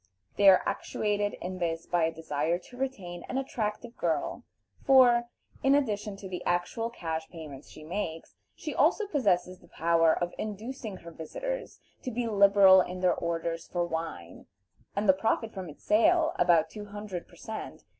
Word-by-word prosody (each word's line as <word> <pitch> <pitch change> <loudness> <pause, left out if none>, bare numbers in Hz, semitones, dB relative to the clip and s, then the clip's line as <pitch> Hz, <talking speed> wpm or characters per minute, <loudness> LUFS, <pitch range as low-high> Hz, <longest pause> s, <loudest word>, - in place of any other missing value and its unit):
They 200 -1 +7
are 185 - +6
actuated 205 -1 -1
in 185 +1 -5
this 165 -1 -2
by 175 -2 +2
a 165 - 0
desire 160 +1 -1
to 185 +7 -15
retain 195 -10 -4
an 260 - -2
attractive 235 -3 -3
girl; 160 -4 -1 0.4
for, 245 -3 +6 0.3
in 270 +1 +4
addition 210 -7 -1
to 195 0 -9
the 180 -1 -5
actual 175 +6 -1
cash 160 -7 -4
payments 150 -5 -10
she 155 - -12
makes, 165 -1 -4 0.2
she - - -5
also 430 - +3
possesses 185 - 0
the 175 - -20
power 165 -1 +3
of 175 +2 -1
inducing 215 0 -5
her 170 -1 -11
visitors - - -5 0.2
to - - -4
be 245 0 -2
liberal 200 -2 +7
in 180 0 -5
their 185 - +4
orders 165 0 -3
for 175 -1 -1
wine, 160 - -6 0.5
and 200 +1 0
the 190 - +8
profit 220 +3 -1
from 185 -4 -6
its 150 - -14
sale, 325 +9 +4
about 170 -2 +4
two 210 -1 -7
hundred 205 -3 -7
per - - -18
cent. 220 0 -7
190 Hz, 170 wpm, -29 LUFS, 170-220 Hz, 0.5 s, the